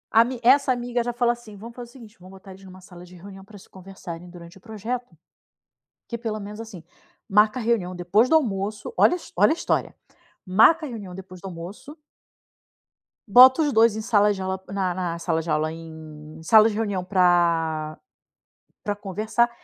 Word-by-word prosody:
Ami 235 +2 +3
essa 270 +2 +4
amiga 245 -1 -2
já 240 - -3
fala 240 0 +1
assim: 230 -4 -13
"Vamos 230 +4 -11
fazer 245 -1 -9
o - - -18
seguinte, 230 -4 -15
vamos 185 +1 -15
botar 190 0 -14
eles 190 +1 -14
numa 185 -1 -13
sala 180 -2 -14
de 180 0 -15
reunião 195 +2 -12
pra 205 +1 -15
se 190 - -17
conversarem 180 -2 -10
durante 170 0 -13
o - - -32
projeto. 225 -2 -6 0.9
Que 235 - -5
pelo 220 -2 -4
menos 210 +1 -9
assim, 220 -7 -10 0.5
marca 210 +5 +3
a - - -5
reunião 210 -6 -1
depois 180 +7 +2
do - - +4
almoço", 210 - -1
olha - - +4 0.2
olha 205 +4 +4
a - - +3
história, 335 - -2 0.5
"Marca 225 - +4
a - - -8
reunião 205 -6 -8
depois 185 0 -11
do 195 - -14
almoço" 185 - -9 1.3
"bota 255 +8 +7
os 295 -2 +1
2 225 -2 +4
em 220 - -4
sala 210 -1 +2
de 190 - -7
aula 190 0 -4
na 190 -2 -2
na 175 -2 -4
sala 165 -1 -1
de 165 - -8
aula 155 +1 0
em 160 -1 -11
sala 215 +6 +6
de 210 - -5
reunião 205 -4 -2
pra 170 -4 +1 0.9
pra 205 -1 -3
conversar, 215 +4 -1
200 Hz, 190 wpm, -23 LUFS, 180-230 Hz, 1.3 s, bota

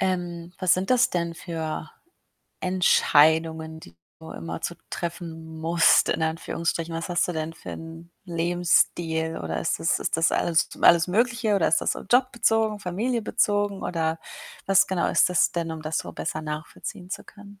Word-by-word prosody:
Ähm, 175 -2 -2
was 185 -2 +4
sind 185 +4 -3
das 255 +1 +4
denn 170 -1 -2
für 160 -3 -5 0.7
Entscheidungen, 160 -3 +3
die 85 0 -15 0.2
du 160 - -10
immer 165 - -6
zu 175 - -3 0.2
treffen 165 -2 -6
musst 165 +1 +4
in - - -1
Anführungsstrichen? 165 +1 -2
Was 165 +2 -4
hast 175 -1 +1
du - - -1
denn 160 0 -4
für - - -9
'n 165 +1 -9
Lebensstil 170 -1 +1
oder 80 -1 -4
ist - - -1
das - - +1
ist - - -1
das 165 - +3
alles 165 -1 +1
alles 170 0 +6
Mögliche 230 +2 +1
oder 195 -5 +2
ist 160 - +3
das - - 0
so - - -7
Job-bezogen, 225 -4 +2
Familie-bezogen? 205 0 -1
Oder 160 -1 -1 0.5
was 195 0 +5
genau 185 -2 0
ist - - +3
das 180 - +3
denn, 170 -1 -2
um 160 -1 -5
das 155 0 -3
so - - -6
besser 155 -1 -4
nachvollziehen 155 +3 -7
zu 195 - -6
können? 205 -1 -15
170 Hz, 165 wpm, -25 LUFS, 160-190 Hz, 0.7 s, alles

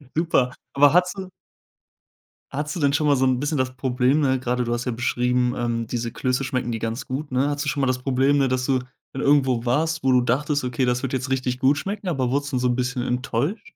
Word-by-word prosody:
Super. 155 -6 +1 0.2
Aber 145 +2 +5
hattest 180 +2 +2
du 190 -1 -6 1.2
Hattest 150 +2 -3
du 175 - -3
denn 140 -1 +2
schon 150 +1 +1
mal 145 - +4
so 130 - +2
'n 130 -1 +2
bisschen 145 +1 -1
das 130 0 -1
Problem, 130 +2 +1
ne, 130 -3 +2
gerade 125 0 -1
du 120 - -3
hast 120 +1 -3
ja 125 - -1
beschrieben, 125 +1 0
ähm, 115 -2 -2
diese 120 -1 -3
Klöße 130 +2 -1
schmecken 125 -2 -2
die 115 - -3
ganz 115 +5 -4
gut, 140 +2 -4
ne? 130 +3 +1
Hattest 145 0 -2
du - - 0
schon 140 0 -2
mal 135 - +2
das 130 0 0
Problem, 135 +2 +2
ne, 135 - +3
dass 125 0 -1
du 130 -2 +2 0.3
dann 135 - -4
irgendwo 130 -4 +3
warst, 160 +5 0
wo 130 - +3
du 125 -1 +5
dachtest: 145 +4 0
„Okay, 125 +1 -1
das 125 0 0
wird 135 -1 -3
jetzt 130 0 -2
richtig 130 -1 -1
gut 140 +1 +3
schmecken“, 195 +5 -4
aber 135 -7 0
wurdest 140 +1 -1
du 130 - 0
trotzdem - - 0
so 125 - +1
'n 120 - +1
bisschen 125 0 -2
enttäuscht? 130 - -2
130 Hz, 255 wpm, -23 LUFS, 125-145 Hz, 1.2 s, Aber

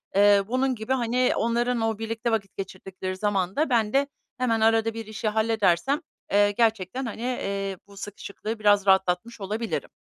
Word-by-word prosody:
Eee, 200 0 +6
bunun 255 +2 +1
gibi, 220 +3 -2
hani, 250 0 +1
onların 235 +1 0
o 225 -1 0
birlikte 225 +1 -2
vakit 200 -3 -2
geçirdikleri 190 -1 -6
zamanda 205 - 0
ben 225 -3 +2
de 275 +1 +3 0.3
hemen 230 -3 +1
arada 225 0 +3
bir 225 -1 -6
işi 215 0 -4
halledersem, 220 - +2 0.3
eee, 205 0 +4
gerçekten, 225 +2 0
hani, 225 0 -6
eee, 195 -6 -2
bu 200 - -16
sıkışıklığı 205 +2 -6
biraz 205 -1 +4
rahatlatmış 190 +4 +2
olabilirim. 215 +4 -3
220 Hz, 155 wpm, -25 LUFS, 200-235 Hz, 0.3 s, Eee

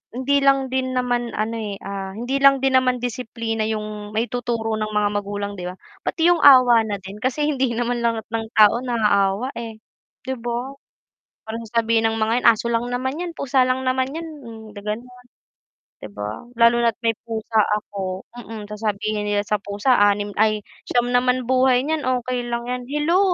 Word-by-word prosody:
hindi 275 +2 +1
lang 275 -1 +3
din 260 0 -1
naman 245 -1 -1
ano 225 +2 -2
eh, 205 -2 -4
ah, 195 -1 -5
hindi 245 +5 -2
lang 275 -1 +5
din 265 -1 +4
naman 250 -1 0
disiplina 230 -2 -3
yung 210 -1 -5
maituturo 230 -1 -1
ng 215 0 -3
mga 205 -1 +2
magulang 205 -1 -4
'di 180 - -4
ba? 180 - -6 0.3
Pati 340 +1 +3
yung 345 - +2
awa 245 -5 +7
na 205 - -2
din 195 +2 -9
kasi 260 +5 -1
hindi 260 -4 0
naman 240 0 -1
lahat 230 -2 0
ng 225 -1 -2
tao 215 +2 +6
naaawa, 215 -1 +1
eh, 225 -2 -6 0.5
'di 260 -1 -4
ba? 240 +3 -3 0.8
Parang 225 +1 -5
sasabihin 225 0 +1
ng - - -3
mga 220 +1 +1
'yan, - - +5
"Aso 230 0 +4
lang 230 +1 0
naman 260 +5 -2
yan, 345 - -4
pusa 265 -1 +2
lang 255 +1 0
naman 260 +1 0
yan," 325 +1 -5 0.2
mm, 225 -1 -10
da 205 - -8
ganun, 215 +4 -4 0.9
'di 105 - -8
ba? 105 - -6
Lalo 235 0 +5
na't 230 -2 +2
may 225 - +4 0.2
pusa 220 0 0 0.2
ako, 195 -3 -5 0.2
mm, 220 -2 -8
sasabihin 210 0 -2
nila 205 0 +1
sa 210 -1 0
pusa 205 +6 0
"anim 205 0 +2
ay 215 -1 +2 0.3
siyam 245 0 +1
naman 250 0 +2
buhay 255 0 +3
niyan, 315 -1 -1 0.2
okey 245 -1 -3
lang 235 0 -2
yan," 250 0 -3
hello? 300 +6 +2
230 Hz, 185 wpm, -22 LUFS, 215-255 Hz, 0.9 s, awa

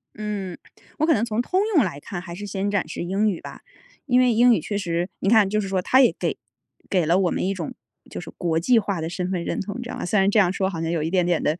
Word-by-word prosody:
嗯， 205 -4 -4 0.4
我 310 - +3
可 325 - +4
能 220 - +1
从 225 0 -1
通 365 +9 0 0.2
用 300 - +6
来 165 -7 -4
看， 175 +3 -6
还 170 -2 -8
是 205 +3 -7
先 200 0 -2
展 200 -6 0
示 - - -6
英 195 +5 +1
语 185 - -4
吧。 - - -10 0.4
因 250 -3 +3
为 250 -2 +4
英 240 +2 +6
语 - - +2
确 205 - -3
实 175 -2 -2
你 195 - 0
看 215 -3 +5
就 215 - +1
是 195 - -4
说， 190 -1 0
它 260 +8 +4
也 250 - +5
给 - - -1 0.5
给 180 -4 +2
了 170 +3 +3
我 185 -2 +2
们 - - -1
一 195 - 0
种 170 -5 -5 0.4
就 - - -6
是 - - -9
国 165 -2 0
际 240 +8 +3
化 200 -5 -1
的 160 - -3
身 180 +1 -3
份 180 -3 -2
认 - - -3
同， 205 +3 -4
你 - - -4
知 240 - -7
道 - - -5
吗？ - - -4
虽 210 +3 +2
然 195 0 +4
这 210 - +1
样 185 -3 +4
说 190 -1 0
好 165 -4 -5
像 165 0 -1
有 170 -2 0
一 160 - -1
点 180 0 +2
点 175 -2 +1
地， 155 +2 0
195 Hz, 325 characters per minute, -23 LUFS, 175-215 Hz, 0.5 s, 用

